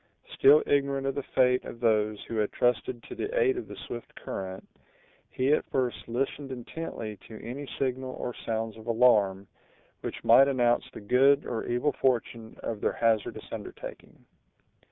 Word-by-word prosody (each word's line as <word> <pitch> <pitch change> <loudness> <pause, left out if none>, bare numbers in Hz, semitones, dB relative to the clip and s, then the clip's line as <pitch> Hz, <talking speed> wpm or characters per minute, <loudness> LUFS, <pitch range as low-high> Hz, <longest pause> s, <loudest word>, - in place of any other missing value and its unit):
Still 145 +3 +6
ignorant 140 -1 +1
of 135 - 0
the 140 - -2
fate 125 -1 +2
of 115 - -9
those 110 -3 +1
who 115 - -5
had 105 -1 +1
trusted 120 0 0
to - - -9
the - - -2
aid 400 -5 +3
of 370 - -5
the - - -8
swift 120 - -8
current, 95 0 -6 0.6
he 130 +3 +1
at - - 0
first 125 -2 -1
listened 135 +3 -2
intently 120 -4 -6
to 110 - -10
any 135 +3 -6
signal 130 -1 -2
or 120 - -4
sounds 110 -1 -3
of 110 +1 -12
alarm, 105 -5 +3 0.5
which - - -6
might 135 +1 +7
announce 125 -2 +2
the - - -9
good 135 +6 +4
or 115 - -3
evil 125 +5 +1
fortune 115 -3 -1
of 110 -3 -4
their - - +1
hazardous 115 -3 0
undertaking. - - -9
125 Hz, 165 wpm, -28 LUFS, 110-135 Hz, 0.6 s, might